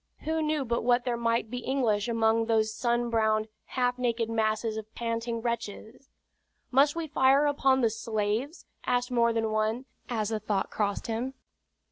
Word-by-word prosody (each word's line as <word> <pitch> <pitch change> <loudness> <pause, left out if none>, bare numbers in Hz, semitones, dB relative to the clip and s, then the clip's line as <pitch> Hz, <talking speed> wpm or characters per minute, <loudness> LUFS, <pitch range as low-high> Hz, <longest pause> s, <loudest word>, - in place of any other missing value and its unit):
Who 320 +1 -1
knew 305 -2 0
but 235 0 -1
what 245 +1 +3
there 245 -2 0
might 230 -1 0
be 250 - -3
English 240 -5 0
among 225 -1 +2
those 220 -1 +2
sun 240 0 0
browned, 220 -1 +1 0.2
half 250 -1 -1
naked 230 -2 0
masses 220 0 0
of 220 0 -7
panting 230 0 -2
wretches? 235 +2 -5 0.6
"Must 280 +3 +4
we 335 -1 -2
fire 275 -1 +4
upon 270 -2 +3
the 230 - +4
slaves?" 225 - -2 0.2
asked 245 0 +1
more 235 -1 +3
than 225 -1 0
one, 215 +4 0 0.2
as 220 -4 -1
the 220 -1 -1
thought 210 -2 -1
crossed 205 -2 -1
him. 240 +4 -3
235 Hz, 165 wpm, -28 LUFS, 220-250 Hz, 0.6 s, Must